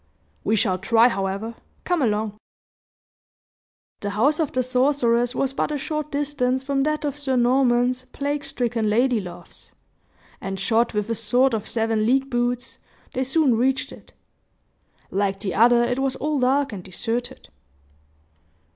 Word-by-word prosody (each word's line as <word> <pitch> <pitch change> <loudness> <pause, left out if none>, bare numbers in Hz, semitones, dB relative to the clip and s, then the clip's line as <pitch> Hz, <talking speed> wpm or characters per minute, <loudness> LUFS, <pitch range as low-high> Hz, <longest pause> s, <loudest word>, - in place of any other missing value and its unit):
"We 220 - +2
shall 190 -3 +1
try, 225 +5 +4
however. 195 +2 -3 0.3
Come 355 -3 0
along!" 215 -3 0 1.6
The 205 - -3
house 260 - +2
of 315 -4 0
the 255 - 0
sorceress 250 -2 +2
was 270 0 0
but 300 - -1
a 295 - -1
short 305 +1 -4
distance 275 -3 0
from 275 0 0
that 305 +1 0
of 285 -2 -2
Sir 280 -3 -1
Norman's 250 0 +2
plague 285 +1 -2
stricken 235 -5 -1
lady 240 +2 +2
love's; 175 -2 -12 0.7
and 195 0 -4
shod 230 +5 +1
with 210 -1 -1
a - - +2
sort 245 +4 +2
of 215 -2 -3
seven 225 -1 0
league 270 +2 +2
boots, 245 0 -1 0.3
they 260 - 0
soon 270 -1 +2
reached 260 +3 0
it. - - -14 1.0
Like 195 0 0
the 195 -3 -3
other, 235 +2 +5
it 245 +2 -1
was 270 -1 0
all 300 -1 -1
dark 270 0 +2
and 190 -3 -7
deserted. 230 +6 -4
245 Hz, 150 wpm, -23 LUFS, 220-270 Hz, 1.6 s, other